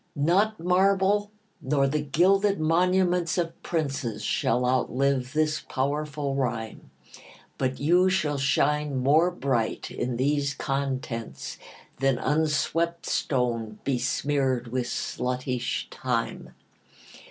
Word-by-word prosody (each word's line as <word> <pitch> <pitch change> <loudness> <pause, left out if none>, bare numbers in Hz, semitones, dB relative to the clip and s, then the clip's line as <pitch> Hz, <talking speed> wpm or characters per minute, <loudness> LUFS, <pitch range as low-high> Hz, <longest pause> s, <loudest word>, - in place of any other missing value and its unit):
NOT 190 +9 +2
marble, 195 +3 +2 0.3
nor 135 0 +2
the 150 +2 0
gilded 195 +6 +3
monuments 180 +2 +2
Of 170 -1 -2
princes, 140 -9 -2
shall 125 +1 +1
outlive 130 +1 +1
this 155 0 +1
powerful 145 +1 -2
rhyme; 120 -5 -3 0.7
But 130 -1 -1
you 175 +5 +4
shall 155 -6 0
shine 145 +1 +1
more 150 +7 +4
bright 130 -10 -2
in 125 -1 -3
these 140 +1 +1
contents 135 -5 -4 0.4
Than 135 -2 +2
unswept 160 +2 0
stone 115 -5 -1
besmear'd 130 -1 0
with 125 0 -2
sluttish 125 0 -2
time. - - -3
140 Hz, 100 wpm, -26 LUFS, 130-170 Hz, 0.7 s, you